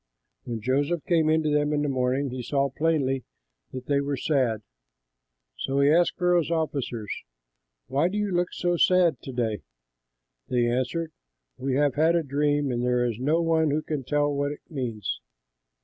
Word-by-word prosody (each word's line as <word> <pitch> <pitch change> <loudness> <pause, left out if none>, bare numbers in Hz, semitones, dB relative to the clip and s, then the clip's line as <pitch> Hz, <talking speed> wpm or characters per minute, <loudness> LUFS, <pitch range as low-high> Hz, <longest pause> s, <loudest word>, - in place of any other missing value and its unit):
When 115 -2 -4
Joseph 145 +7 0
came 165 -3 +3
in 160 0 +3
to 155 - 0
them 150 0 +2
in 150 -1 +1
the - - 0
morning, 130 0 0
he 130 0 -4
saw 140 +2 0
plainly 135 -4 0 0.5
that 130 -1 -7
they 140 -1 +1
were 140 0 -2
sad. 125 -7 0 1.0
So 135 +1 -1
he 140 +1 +5
asked 170 +1 +3
Pharaoh's 175 -3 +2
officers, 140 -10 -2 0.7
"Why 140 +6 +1
do 195 +3 -3
you 210 -1 -1
look 175 0 0
so 175 -1 0
sad 180 -1 +3
to 135 - -7
day?" 115 -6 -1 0.9
They 120 -1 +1
answered, 130 +7 -1 0.4
"We 130 0 -2
have 145 -1 +2
had 160 +4 +3
a 170 - +2
dream, 145 0 +1
and 120 0 -1
there 125 0 +2
is 115 -2 -2
no 155 +6 +2
one 160 -1 +2
who 150 +2 0
can 150 -4 -3
tell 145 +2 +1
what 145 0 -1
it 150 - -8
means." 115 - -3
145 Hz, 180 wpm, -26 LUFS, 130-160 Hz, 1.0 s, he